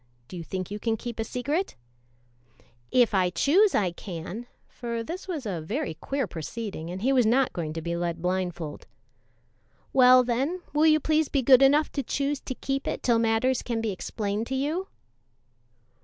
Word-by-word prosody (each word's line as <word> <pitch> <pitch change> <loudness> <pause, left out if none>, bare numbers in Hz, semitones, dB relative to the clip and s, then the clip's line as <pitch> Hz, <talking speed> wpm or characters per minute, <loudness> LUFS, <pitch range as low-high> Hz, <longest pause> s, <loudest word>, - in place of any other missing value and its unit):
Do - - -10
you 170 - -5
think 185 +2 -5
you 205 - -4
can 225 +1 0
keep 235 0 -7
a - - +1
secret?" 285 - -2 1.1
"If 245 -3 +3
I 185 -2 +3
choose 370 - +3
I 190 -4 +2
can 185 +6 -7 0.2
for 235 -1 -5
this 350 - -6
was 315 -9 -4
a 185 -6 -3
very 220 - -3
queer 270 - -2
proceeding, 175 0 -6
and 185 +3 -6
he 270 +2 +3
was 250 -4 +4
not 255 +3 +3
going 160 -3 -3
to 165 0 -5
be 170 +1 -2
led 170 -1 -2
blindfold. 175 -3 -3 1.1
"Well, 255 -1 +7
then, 270 +9 -1
will 305 +2 +4
you 310 0 +5
please 310 0 +1
be 275 -2 0
good 260 +1 +7
enough 290 +3 +4
to 280 - -2
choose 280 +1 -1
to 260 - -6
keep 270 +2 -3
it - - -3
till 235 -2 +3
matters 230 +3 +2
can 235 -2 -2
be 225 -2 -1
explained 205 +3 -3
to 265 - -2
you?" 310 +8 -1
235 Hz, 185 wpm, -27 LUFS, 185-275 Hz, 1.1 s, Well